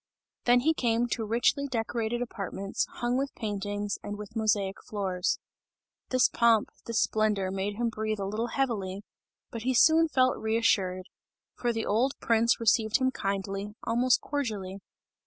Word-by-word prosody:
Then 245 Hz, 0 st, +5 dB
he 320 Hz, +5 st, +3 dB
came 235 Hz, -4 st, +1 dB
to 225 Hz, -, -1 dB
richly 240 Hz, +6 st, +1 dB
decorated 235 Hz, -1 st, -2 dB
apartments, 195 Hz, -3 st, -3 dB
hung 240 Hz, +2 st, -1 dB
with 275 Hz, +1 st, -3 dB
paintings 205 Hz, -1 st, -3 dB
and 205 Hz, 0 st, -6 dB
with 210 Hz, +2 st, -9 dB
mosaic 210 Hz, -3 st, 0 dB
floors. 190 Hz, -3 st, -1 dB, 0.7 s
This 255 Hz, -1 st, +4 dB
pomp, 230 Hz, -2 st, +3 dB, 0.2 s
this 230 Hz, -1 st, 0 dB
splendour 210 Hz, -3 st, +1 dB
made 195 Hz, +2 st, -2 dB
him 235 Hz, +2 st, 0 dB
breathe 215 Hz, -1 st, -2 dB
a 195 Hz, -, -2 dB
little 215 Hz, +4 st, -2 dB
heavily, 210 Hz, -7 st, -2 dB, 0.5 s
but 230 Hz, -, -5 dB
he 255 Hz, +2 st, 0 dB
soon 320 Hz, +5 st, +6 dB
felt 255 Hz, -4 st, +2 dB
reassured; 200 Hz, -5 st, +1 dB, 0.5 s
for 240 Hz, -, -1 dB
the 225 Hz, -1 st, -2 dB
old 245 Hz, +6 st, +2 dB
prince, 230 Hz, 0 st, +2 dB
received 220 Hz, -1 st, +3 dB
him 260 Hz, -1 st, +1 dB
kindly, 195 Hz, -1 st, -3 dB
almost 245 Hz, +1 st, +2 dB
cordially. 210 Hz, -9 st, -3 dB
225 Hz, 150 wpm, -28 LUFS, 205-240 Hz, 0.7 s, soon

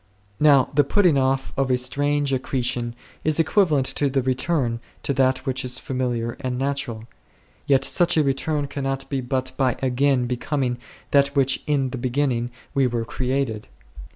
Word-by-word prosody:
Now 140 Hz, -4 st, +5 dB
the 145 Hz, +1 st, +4 dB
putting 180 Hz, +2 st, +3 dB
off' 135 Hz, 0 st, 0 dB
of 135 Hz, -1 st, 0 dB
a 125 Hz, -, +3 dB
strange 140 Hz, +3 st, 0 dB
accretion 125 Hz, -2 st, -2 dB, 0.3 s
is 155 Hz, 0 st, +1 dB
equivalent 160 Hz, -4 st, +3 dB
to 145 Hz, -, +2 dB
the 135 Hz, -1 st, 0 dB
re 130 Hz, 0 st, +2 dB
turn 130 Hz, -4 st, -1 dB, 0.2 s
to 140 Hz, -, 0 dB
that 130 Hz, -1 st, +1 dB
which 130 Hz, 0 st, -1 dB
is 125 Hz, 0 st, -2 dB
familiar 125 Hz, -3 st, -2 dB
and 130 Hz, -3 st, -3 dB
natural; 135 Hz, -5 st, -2 dB, 0.6 s
yet 135 Hz, -1 st, +3 dB
such 175 Hz, -1 st, +3 dB
a 155 Hz, -, +5 dB
return 145 Hz, +2 st, -1 dB
cannot 135 Hz, -1 st, -3 dB
be 135 Hz, -2 st, -1 dB
but 130 Hz, +1 st, -2 dB
by 130 Hz, -3 st, +2 dB
again 130 Hz, 0 st, +1 dB
becoming 125 Hz, 0 st, -2 dB, 0.3 s
that 140 Hz, -1 st, +5 dB
which 135 Hz, -1 st, +2 dB
in 135 Hz, -3 st, +1 dB
the 130 Hz, -, -5 dB
beginning 125 Hz, -1 st, 0 dB, 0.2 s
we 135 Hz, -2 st, +3 dB
were 120 Hz, -2 st, -2 dB
created. 125 Hz, -3 st, -2 dB
135 Hz, 165 wpm, -23 LUFS, 125-140 Hz, 0.6 s, Now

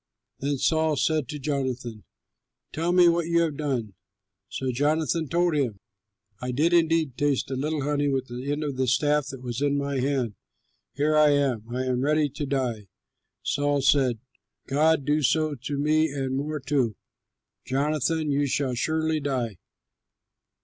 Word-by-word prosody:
Then 140 Hz, +1 st, -1 dB
Saul 160 Hz, +2 st, +2 dB
said 155 Hz, -2 st, +1 dB
to 150 Hz, -, -5 dB
Jonathan, 130 Hz, -6 st, -3 dB, 0.7 s
"Tell 165 Hz, +3 st, 0 dB
me 180 Hz, -1 st, +6 dB
what 170 Hz, -1 st, +2 dB
you 170 Hz, 0 st, +3 dB
have 160 Hz, -3 st, 0 dB
done." 130 Hz, -9 st, -2 dB, 0.6 s
So 130 Hz, -1 st, -2 dB
Jonathan 155 Hz, +4 st, 0 dB
told 175 Hz, 0 st, +2 dB
him, 130 Hz, -9 st, 0 dB, 0.6 s
"I 125 Hz, -, -3 dB
did 155 Hz, +7 st, +2 dB
indeed 165 Hz, -5 st, +2 dB
taste 145 Hz, -2 st, 0 dB
a -, -, -1 dB
little 150 Hz, +2 st, -2 dB
honey 145 Hz, 0 st, 0 dB
with 135 Hz, -2 st, 0 dB
the 125 Hz, +3 st, -5 dB
end 145 Hz, +1 st, -1 dB
of 140 Hz, -3 st, -3 dB
the 130 Hz, 0 st, +1 dB
staff 145 Hz, +2 st, +2 dB
that 135 Hz, -3 st, -8 dB
was 120 Hz, +1 st, -4 dB
in 145 Hz, 0 st, +2 dB
my 140 Hz, -1 st, -1 dB
hand. 130 Hz, -4 st, 0 dB, 0.6 s
Here 150 Hz, +2 st, +1 dB
I 150 Hz, -1 st, +6 dB
am! 135 Hz, -6 st, 0 dB
I 125 Hz, +2 st, -2 dB
am 125 Hz, -1 st, 0 dB
ready 150 Hz, +1 st, +2 dB
to 145 Hz, +1 st, -5 dB
die." 125 Hz, -6 st, -2 dB, 0.6 s
Saul 145 Hz, -1 st, 0 dB
said, 135 Hz, -4 st, +3 dB, 0.5 s
"God 150 Hz, 0 st, +2 dB
do 150 Hz, +1 st, +2 dB
so 155 Hz, +3 st, +2 dB
to 140 Hz, +2 st, -5 dB
me 155 Hz, +2 st, +3 dB
and 135 Hz, -2 st, -2 dB
more 150 Hz, +2 st, -2 dB
too; 135 Hz, -5 st, 0 dB, 0.7 s
Jonathan, 150 Hz, +3 st, 0 dB
you 140 Hz, 0 st, +1 dB
shall 135 Hz, -1 st, 0 dB
surely 160 Hz, +4 st, 0 dB
die!" 125 Hz, -, -2 dB
145 Hz, 165 wpm, -26 LUFS, 130-155 Hz, 0.7 s, me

